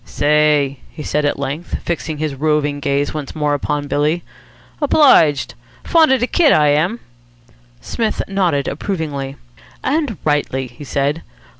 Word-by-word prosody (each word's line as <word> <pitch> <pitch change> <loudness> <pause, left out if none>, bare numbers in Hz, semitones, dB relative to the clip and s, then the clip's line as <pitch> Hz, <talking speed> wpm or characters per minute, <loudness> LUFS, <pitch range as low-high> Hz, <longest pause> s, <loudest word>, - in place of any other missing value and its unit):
"Say!" 150 -2 +2
he 150 - -9
said 150 +1 -1
at 145 - 0
length, 140 +5 -4
fixing 160 -2 -3
his 155 -1 -2
roving 145 0 0
gaze 140 0 -1
once 150 -3 -6
more 150 -1 0
upon 145 0 -2
Billy. 150 +4 0 0.6
"Obliged. 260 - +4 0.3
Fond 325 -4 +4
of 265 -3 +3
de - - +3
kit, 305 +2 +3
I 150 -1 +4
am." 170 +11 +1 0.8
Psmith 220 - -2
nodded 180 -8 0
approvingly. 145 -5 -4 0.5
"And 285 - 0
rightly," 145 -3 0
he 120 +3 -12
said. 140 +4 -1
150 Hz, 140 wpm, -18 LUFS, 145-175 Hz, 0.8 s, Obliged